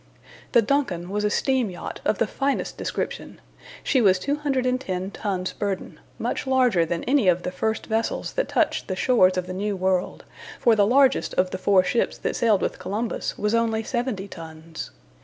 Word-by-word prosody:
The 235 Hz, -2 st, +6 dB
DUNCAN 205 Hz, -9 st, -1 dB
was 210 Hz, +1 st, -1 dB
a 210 Hz, -, +2 dB
steam 260 Hz, 0 st, +1 dB
yacht 175 Hz, -, -7 dB
of -, -, +2 dB
the -, -, +2 dB
finest 275 Hz, 0 st, -2 dB
description. -, -, -4 dB, 0.4 s
She 260 Hz, -, +2 dB
was 190 Hz, -4 st, +5 dB
210 255 Hz, -7 st, -1 dB
tons 190 Hz, -4 st, -3 dB
burden 200 Hz, -2 st, -4 dB, 0.2 s
much -, -, -3 dB
larger 250 Hz, -10 st, +3 dB
than 170 Hz, 0 st, -2 dB
any 260 Hz, -5 st, +2 dB
of 180 Hz, 0 st, +3 dB
the 180 Hz, -, -3 dB
first 220 Hz, +4 st, -2 dB
vessels 225 Hz, 0 st, -2 dB
that -, -, -1 dB
touched -, -, +1 dB
the 185 Hz, -, -2 dB
shores 185 Hz, -4 st, +3 dB
of 180 Hz, -, -1 dB
the 185 Hz, -, -6 dB
New 200 Hz, +2 st, -2 dB
World, 185 Hz, -1 st, -1 dB, 0.4 s
for 235 Hz, -2 st, +4 dB
the 205 Hz, -1 st, +4 dB
largest 265 Hz, +3 st, +3 dB
of 185 Hz, 0 st, +2 dB
the 185 Hz, -, -4 dB
four 190 Hz, -1 st, +4 dB
ships 235 Hz, -, 0 dB
that -, -, -2 dB
sailed 220 Hz, -4 st, +2 dB
with -, -, -2 dB
Columbus 220 Hz, +4 st, -3 dB
was 210 Hz, +1 st, 0 dB
only 225 Hz, -1 st, +1 dB
70 240 Hz, -5 st, -2 dB
tons. 160 Hz, -1 st, -8 dB
210 Hz, 180 wpm, -24 LUFS, 185-250 Hz, 0.4 s, The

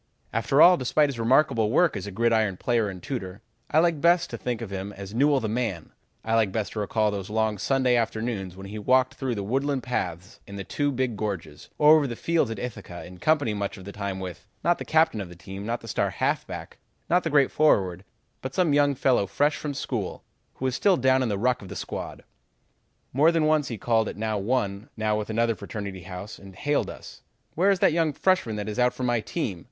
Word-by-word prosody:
"After 140 Hz, +3 st, +4 dB
all, 180 Hz, +1 st, +8 dB
despite 145 Hz, +3 st, +2 dB
his 130 Hz, -4 st, -5 dB
remarkable 115 Hz, -2 st, +3 dB
work 165 Hz, +7 st, +3 dB
as -, -, -5 dB
a -, -, -5 dB
gridiron 110 Hz, -2 st, +1 dB
player 115 Hz, -2 st, +1 dB
and 90 Hz, -2 st, -9 dB
tutor, 100 Hz, -8 st, -5 dB, 0.3 s
I 150 Hz, -, +1 dB
like 165 Hz, -2 st, +3 dB
best 175 Hz, +1 st, +3 dB
to -, -, -4 dB
think 125 Hz, -2 st, -2 dB
of 105 Hz, -, -7 dB
him 95 Hz, +1 st, -4 dB
as 100 Hz, +1 st, -9 dB
Newell, 140 Hz, +3 st, +3 dB
the 110 Hz, -, -2 dB
man; 110 Hz, -7 st, -3 dB, 0.3 s
I 110 Hz, -, -1 dB
like 110 Hz, -4 st, +3 dB
best 110 Hz, +1 st, -2 dB
to 110 Hz, -, -4 dB
recall 105 Hz, +1 st, +1 dB
those 100 Hz, -1 st, -5 dB
long 110 Hz, -1 st, 0 dB
Sunday 130 Hz, 0 st, +2 dB
afternoons 110 Hz, -5 st, -2 dB
when 95 Hz, -, -9 dB
he 105 Hz, +2 st, -6 dB
walked 130 Hz, +4 st, +3 dB
through 130 Hz, -3 st, -3 dB
the 100 Hz, -, -3 dB
woodland 135 Hz, +5 st, -1 dB
paths 90 Hz, -7 st, -4 dB
in 100 Hz, -, -9 dB
the 100 Hz, -, -5 dB
two 145 Hz, +8 st, -1 dB
big 130 Hz, -3 st, -1 dB
gorges, 100 Hz, -5 st, -5 dB
or 150 Hz, +1 st, +7 dB
over 145 Hz, -2 st, +1 dB
the 120 Hz, -, -5 dB
fields 165 Hz, -1 st, +1 dB
at 115 Hz, -, -4 dB
Ithaca 105 Hz, -7 st, -7 dB
in 90 Hz, 0 st, -12 dB
company 145 Hz, -, +2 dB
much 100 Hz, -1 st, -3 dB
of 95 Hz, -, -11 dB
the 100 Hz, -, -7 dB
time 100 Hz, -2 st, -4 dB
with 90 Hz, -2 st, -7 dB, 0.2 s
not 175 Hz, +2 st, +2 dB
the -, -, -5 dB
captain 160 Hz, -8 st, +2 dB
of 95 Hz, -, -7 dB
the 90 Hz, -, -11 dB
team, 95 Hz, +4 st, -8 dB
not 120 Hz, +1 st, -2 dB
the 115 Hz, -, -11 dB
star 105 Hz, -, 0 dB
halfback, -, -, -3 dB, 0.3 s
not 180 Hz, +2 st, +3 dB
the 165 Hz, -, -1 dB
great 140 Hz, -3 st, +4 dB
forward, 95 Hz, -, +2 dB, 0.4 s
but 130 Hz, 0 st, -6 dB
some 175 Hz, -6 st, +2 dB
young 145 Hz, -1 st, +3 dB
fellow 125 Hz, -6 st, +2 dB
fresh 145 Hz, +8 st, +1 dB
from 145 Hz, -2 st, -4 dB
school 115 Hz, -8 st, -4 dB, 0.3 s
who 130 Hz, -, -5 dB
was 130 Hz, -, +1 dB
still 190 Hz, +7 st, +3 dB
down 130 Hz, 0 st, +3 dB
in 125 Hz, -, 0 dB
the 100 Hz, -, -1 dB
ruck 125 Hz, +4 st, +1 dB
of 95 Hz, -, -10 dB
the -, -, -7 dB
squad. -, -, -6 dB, 0.9 s
More 150 Hz, +6 st, +5 dB
than 165 Hz, -2 st, +2 dB
once 155 Hz, -2 st, +2 dB
he 115 Hz, -, -4 dB
called 110 Hz, 0 st, +1 dB
at -, -, -8 dB
now 110 Hz, -1 st, -1 dB
one, 100 Hz, -1 st, -1 dB
now 110 Hz, -1 st, 0 dB
another 115 Hz, +2 st, 0 dB
fraternity 100 Hz, -2 st, -6 dB
house 90 Hz, +3 st, -8 dB
and 95 Hz, -1 st, -13 dB
hailed 145 Hz, +7 st, 0 dB
us: -, -, -11 dB, 0.3 s
'Where 185 Hz, +5 st, +3 dB
is 195 Hz, -, +4 dB
that 190 Hz, -, +5 dB
young 165 Hz, -2 st, +1 dB
freshman 180 Hz, -, +1 dB
that 105 Hz, -1 st, -4 dB
is 110 Hz, +3 st, -4 dB
out 125 Hz, 0 st, +3 dB
for 130 Hz, -, -5 dB
my 120 Hz, -1 st, +2 dB
team? 110 Hz, -, -3 dB
115 Hz, 230 wpm, -26 LUFS, 100-140 Hz, 0.9 s, all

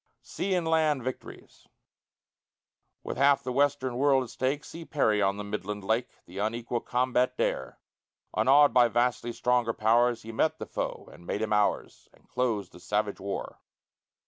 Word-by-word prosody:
SEA 195 Hz, -1 st, -2 dB
AND 175 Hz, -2 st, -1 dB
LAND 155 Hz, -5 st, +2 dB
VICTORIES 130 Hz, +1 st, -8 dB, 1.4 s
With -, -, -5 dB
half 140 Hz, 0 st, +4 dB
the 130 Hz, -, -3 dB
Western 135 Hz, -2 st, +1 dB
world 135 Hz, -1 st, +3 dB
at 125 Hz, -, -10 dB
stake, 135 Hz, +3 st, -2 dB
See 165 Hz, -, -9 dB
Perry 110 Hz, -10 st, +1 dB
on 100 Hz, 0 st, +1 dB
the 105 Hz, -, -4 dB
midland 105 Hz, 0 st, -5 dB
lake, 115 Hz, +5 st, 0 dB, 0.2 s
The 95 Hz, +3 st, -9 dB
unequal 115 Hz, +3 st, -2 dB
combat 125 Hz, +1 st, 0 dB
dare; -, -, -2 dB, 0.6 s
Unawed 145 Hz, +2 st, +5 dB
by 125 Hz, -1 st, +6 dB
vastly 120 Hz, +1 st, 0 dB
stronger 120 Hz, -1 st, +1 dB
pow'rs, 120 Hz, +2 st, +2 dB
He 115 Hz, -, -7 dB
met 135 Hz, +8 st, 0 dB
the -, -, -6 dB
foe -, -, -5 dB
and 85 Hz, -, -15 dB
made 105 Hz, -, -2 dB
him 110 Hz, -, -1 dB
ours, 105 Hz, -1 st, -1 dB
And -, -, -28 dB
closed 115 Hz, -7 st, -1 dB
the -, -, -14 dB
savage 105 Hz, +2 st, -2 dB
war. 100 Hz, +1 st, -5 dB
120 Hz, 165 wpm, -28 LUFS, 105-135 Hz, 1.4 s, by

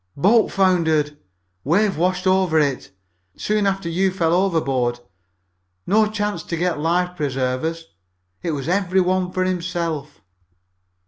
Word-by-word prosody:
"Boat 210 Hz, +8 st, +4 dB
foundered. 160 Hz, -6 st, +2 dB, 0.5 s
Wave 195 Hz, +7 st, +2 dB
washed 180 Hz, +3 st, 0 dB
over 185 Hz, -3 st, +3 dB
it 140 Hz, -10 st, 0 dB, 0.5 s
soon 210 Hz, -1 st, 0 dB
after 195 Hz, -3 st, -1 dB
you 185 Hz, +3 st, +1 dB
fell 170 Hz, -3 st, 0 dB
overboard. 135 Hz, -10 st, +1 dB, 0.9 s
No 215 Hz, +2 st, +3 dB
chance 210 Hz, -4 st, -2 dB
to 170 Hz, -, -5 dB
get 175 Hz, -2 st, -1 dB
life 180 Hz, +3 st, 0 dB
preservers. 140 Hz, +3 st, -2 dB, 0.6 s
It 165 Hz, -, -2 dB
was 140 Hz, -2 st, -4 dB
every 190 Hz, +1 st, +1 dB
one 185 Hz, 0 st, +1 dB
for 185 Hz, 0 st, 0 dB
himself." 170 Hz, -5 st, -3 dB
175 Hz, 125 wpm, -21 LUFS, 155-190 Hz, 0.9 s, Boat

